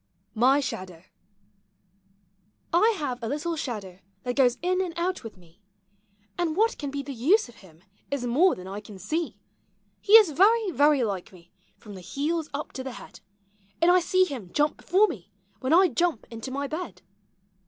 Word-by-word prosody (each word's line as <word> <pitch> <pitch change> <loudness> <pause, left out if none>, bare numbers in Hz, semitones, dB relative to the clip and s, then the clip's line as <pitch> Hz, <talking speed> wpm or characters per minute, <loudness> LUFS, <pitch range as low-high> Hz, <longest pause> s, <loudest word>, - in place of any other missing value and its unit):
MY 260 +5 +4
SHADOW. 185 -9 -6 1.7
I 435 +6 +4
have 255 -5 -4
a 230 - -3
little 300 +6 -2
shadow 210 - -6 0.2
that 245 -1 -3
goes 250 -3 +3
in 365 +1 +1
and 350 -3 -4
out 360 +2 -2
with 225 -4 -9
me. 175 +2 -22 0.8
And 330 -3 0
what 450 +3 +2
can 285 - -4
be 280 0 -4
the 275 0 -6
use 310 - +3
of 240 - -17
him 170 -3 -19 0.3
is 280 -3 -2
more 305 +11 +3
than 185 0 -10
I 195 +2 -5
can 210 -1 -12
see. 210 - -3
i:U - - 0
POEMS - - -11
OF - - -26
HOME. - - -42
He 415 - 0
is 435 -7 +9
very, 410 +6 +3
very 290 -2 +3
like 195 -5 -3
me 175 -2 -18 0.3
from 210 - -12
the 190 - -9
heels 305 - -2
up 285 +2 -5
to 260 - -5
the 265 -1 -6
head; - - -12 0.6
Aud 340 - +6
I 365 +1 +6
see 370 +2 +2
him 245 - -7
jump 295 0 +1
before 390 +5 +3
me, 205 - -8 0.3
when 260 - -2
I 365 +3 +6
jump 315 -2 -1
into 230 +2 -7
my 280 +2 -3
bed. 315 +5 -6
280 Hz, 195 wpm, -26 LUFS, 225-345 Hz, 1.7 s, is